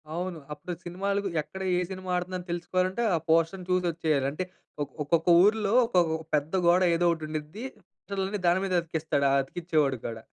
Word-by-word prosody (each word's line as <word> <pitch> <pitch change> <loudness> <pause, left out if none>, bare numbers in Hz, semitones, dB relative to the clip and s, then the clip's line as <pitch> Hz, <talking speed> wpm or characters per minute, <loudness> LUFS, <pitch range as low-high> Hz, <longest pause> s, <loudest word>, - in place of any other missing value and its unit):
అవును. 175 -2 -3
అప్పుడు 175 +4 -6
సినిమాలకు 195 +3 -1
ఎక్కడ 190 +5 -9 0.2
ఏ - - +2
సినిమా 185 0 -7
ఆడుతుందని 180 0 -4
తెలుసుకోవాలంటే 185 +5 -1
ఆ - - +2
పోస్ట‌ర్‌ని 165 +3 +2
చూసొచ్చేయాలి. 165 -6 +1
అంటే 185 +5 -3 0.4
ఒక్ 145 - -10
ఒక్కొక్క 165 +3 +1 0.2
ఊర్లో 210 0 +3
ఒకొక 170 -7 +2 0.2
పెద్ద 150 +4 -1
గోడ 180 +2 +5
ఏదో 175 +1 +1
ఒకటుండిద్ది 155 +6 -6
పోస్టర్‌లన్ని 195 0 -5
దాని 180 +2 +3
మీదే 185 -2 +1
అతికిస్తాడు 160 -3 -1
ఆ - - +3
అతికిచ్చేవాడు 155 -3 0
కూడా. 115 -1 -6
175 Hz, 155 wpm, -28 LUFS, 160-185 Hz, 0.4 s, గోడ